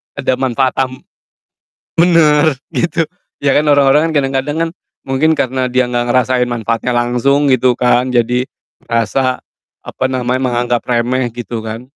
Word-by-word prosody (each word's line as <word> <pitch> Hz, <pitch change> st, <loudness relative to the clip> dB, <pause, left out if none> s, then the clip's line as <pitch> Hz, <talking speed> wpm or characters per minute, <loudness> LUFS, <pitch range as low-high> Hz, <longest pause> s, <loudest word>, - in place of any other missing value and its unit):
Ada 130 Hz, -2 st, -1 dB
manfaat 130 Hz, 0 st, +1 dB
tamb 130 Hz, -1 st, -3 dB, 0.9 s
bener! 160 Hz, -4 st, +4 dB, 0.2 s
Gitu. 170 Hz, -1 st, 0 dB, 0.4 s
Ya 140 Hz, -, +3 dB
kan, 150 Hz, 0 st, +2 dB
orang-orang 145 Hz, +2 st, +4 dB
kan 160 Hz, -, -3 dB
kadang-kadang 135 Hz, +3 st, -2 dB
kan 165 Hz, 0 st, -1 dB, 0.3 s
mungkin 150 Hz, +4 st, +1 dB
karena 130 Hz, -2 st, -1 dB
dia 130 Hz, 0 st, +1 dB
gak 120 Hz, 0 st, -2 dB
ngerasain 125 Hz, 0 st, +1 dB
manfaatnya 120 Hz, +1 st, -2 dB
langsung 135 Hz, +4 st, +2 dB
gitu 125 Hz, -1 st, +2 dB
kan, 125 Hz, 0 st, +2 dB
jadi 125 Hz, +1 st, 0 dB, 0.4 s
rasa 125 Hz, +3 st, 0 dB, 0.4 s
apa -, -, -5 dB
namanya, 130 Hz, 0 st, -1 dB
menganggap 120 Hz, -1 st, 0 dB
remeh, 125 Hz, +1 st, 0 dB
gitu 120 Hz, -1 st, -5 dB
kan. 115 Hz, +4 st, -8 dB
130 Hz, 140 wpm, -15 LUFS, 120-140 Hz, 0.9 s, bener